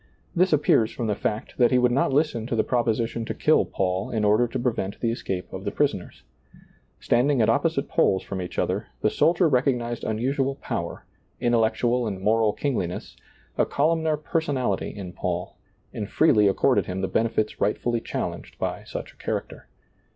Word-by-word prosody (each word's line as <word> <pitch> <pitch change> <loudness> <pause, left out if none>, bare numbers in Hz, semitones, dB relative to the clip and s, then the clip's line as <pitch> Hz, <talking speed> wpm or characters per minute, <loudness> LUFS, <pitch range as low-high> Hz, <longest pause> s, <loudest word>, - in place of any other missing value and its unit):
This 185 +2 +3
appears 140 -7 +3
from 120 - -4
the 105 - +1
fact 105 +4 -4
that 120 - +6
he 125 - +3
would 125 0 +3
not 135 +3 +2
listen 135 -6 +1
to 125 - -1
the 110 - +2
proposition 115 -1 0
to - - -4
kill - - +3
Paul 95 0 -1
in 110 -2 0
order 105 +4 +4
to 125 - -4
prevent 115 -5 -2
the 115 - 0
escape 95 -5 -4
of 95 - -6
the 100 - -1
prisoners. 140 -7 -2 0.8
Standing 130 +3 +2
at 110 - +3
opposite - - 0
poles 95 -1 +2
from 95 -1 -5
each 90 - -7
other, - - -1
the - - +2
soldier 175 +1 +3
recognized 125 -4 0
unusual 135 +5 0
power, - - -5 0.3
intellectual 120 +1 +2
and 100 -3 -4
moral 110 +2 +3
kingliness, 105 -10 -3 0.4
a - - +5
columnar 160 +1 +1
personality 145 - -1
in 95 -4 -8
Paul, - - -3 0.4
and 105 -1 -4
freely 105 -10 +4
accorded 95 - +2
him 95 +1 -3
the 95 - 0
benefits 110 0 -1
rightfully 115 +3 0
challenged - - -5
by - - -3
such - - -7
a - - -31
character. - - -5
120 Hz, 175 wpm, -25 LUFS, 105-135 Hz, 0.8 s, that